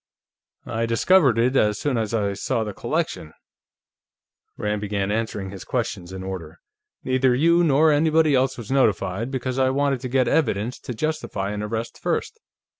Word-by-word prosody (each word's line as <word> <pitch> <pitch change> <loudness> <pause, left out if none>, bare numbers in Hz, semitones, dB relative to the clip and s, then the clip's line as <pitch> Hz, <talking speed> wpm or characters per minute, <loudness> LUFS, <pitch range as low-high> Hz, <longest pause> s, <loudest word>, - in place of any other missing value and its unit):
"I 115 +1 -2
discovered 130 +2 +4
it 125 +3 +2
as 105 -5 +3
soon 145 +1 -1
as 110 -3 -1
I 105 -3 0
saw 110 +3 -1
the 105 -2 -5
collection," 150 - -3 1.2
Rand 105 0 -2
began 100 -1 -2
answering 105 -3 -2
his 95 -2 -8
questions 85 0 -3
in 95 0 -6
order. 90 -4 -6 0.5
"Neither 130 -1 +2
you, 170 +5 +4
nor 155 0 +4
anybody 155 0 +3
else 130 0 +2
was 120 0 -7
notified, 110 -4 +1
because 130 -1 -3
I 130 0 +3
wanted 140 0 +1
to 130 - -5
get 130 0 +2
evidence 115 -5 0
to 125 - -7
justify 130 -9 -2
an 105 0 -4
arrest 110 +2 -4
first. - - -2
115 Hz, 165 wpm, -23 LUFS, 105-135 Hz, 1.2 s, discovered